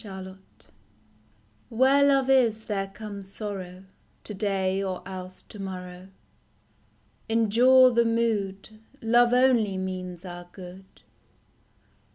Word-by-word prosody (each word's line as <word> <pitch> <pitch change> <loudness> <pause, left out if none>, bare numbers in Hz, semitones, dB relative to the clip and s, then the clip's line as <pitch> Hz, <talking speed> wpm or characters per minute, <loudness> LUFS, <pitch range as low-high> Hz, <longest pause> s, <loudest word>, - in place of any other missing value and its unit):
7t7HERE 190 -2 -9 1.7
love 275 -2 +3
is, 240 -5 +3
there 200 -3 -3
comes 200 -1 -9
sorrow 190 -3 -6 0.4
To 210 - -7
day 195 -1 -1
or 190 -2 -4
else 185 -1 -8
to 210 - -13
morrow; 180 -1 -7 1.2
Endure 240 +4 +5
the 235 0 +3
mood, 215 -3 -1 0.2
Love 240 +1 +4
only 245 -6 +3
means 185 -1 -5
our 175 -1 -9
good. 185 0 -13
195 Hz, 100 wpm, -26 LUFS, 185-230 Hz, 1.7 s, Endure